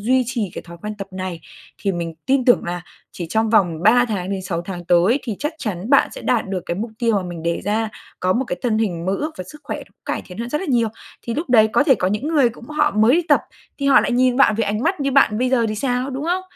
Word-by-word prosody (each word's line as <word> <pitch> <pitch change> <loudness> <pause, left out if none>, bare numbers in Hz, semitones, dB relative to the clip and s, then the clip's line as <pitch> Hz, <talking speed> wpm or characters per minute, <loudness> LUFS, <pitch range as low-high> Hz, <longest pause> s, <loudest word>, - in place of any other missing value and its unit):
duy 255 +5 +2
trì 230 -6 -2
cái - - -6
thói 170 0 -11
quen 210 0 -4
tập 195 - -5
này 185 -3 -5 0.4
thì 195 - -1
mình 170 -2 -4
tin 265 -1 +2
tưởng 245 - +4
là 175 +1 -3 0.3
chỉ 175 - -5
trong 220 0 +1
vòng 175 -7 +2
3 245 +5 +5
tháng 195 -3 -3
đến 195 -1 -3
6 170 -2 -3
tháng 175 -1 -7
tới 180 - +3
thì 225 -6 -4
chắc 295 +3 -1
chắn 210 -1 -4
bạn 275 - +5
sẽ - - -9
đạt 235 -5 0
được 185 -3 -3
cái 170 - -1
mục 220 +4 -4
tiêu 230 -3 +2
mà 195 - 0
mình 175 -2 -7
đề 170 0 -1
ra, 220 +2 0 0.3
có 185 0 +2
một 250 +6 0
cái 180 -7 -4
thân 225 -3 +1
hình 180 -6 -1
mơ 190 - +1
ước 305 +9 -2
và 185 - -4
sức 300 - -13
khỏe - - -5 0.2
cải - - -3
thiện 180 +1 -11
hơn 235 +1 -3
rất 300 - -1
là 385 - -4
nhiều. 235 -2 +2 0.3
Thì 235 - -4
lúc 310 -2 -3
đấy 220 -3 +6
có 290 - +4
thể 270 - +5
có 185 - 0
những 210 +9 -2
người 290 -7 +4
cũng 235 +1 -14
họ 300 0 +2
mới 220 +7 +4
đi 350 - +2
tập - - +5 0.4
thì 280 - -1
họ 275 - +6
lại - - -1
nhìn 250 0 +3
bạn 275 -5 +5
với 225 +1 0
ánh 210 +3 -2
mắt 365 +2 0
như 275 -1 0
bạn 220 -6 +4
bây 250 +1 +1
giờ 240 -3 +3
thì 215 - -2
sao, 250 +3 -1
đúng 270 +3 -4
không? 360 +2 0
225 Hz, 290 wpm, -20 LUFS, 185-260 Hz, 0.4 s, đấy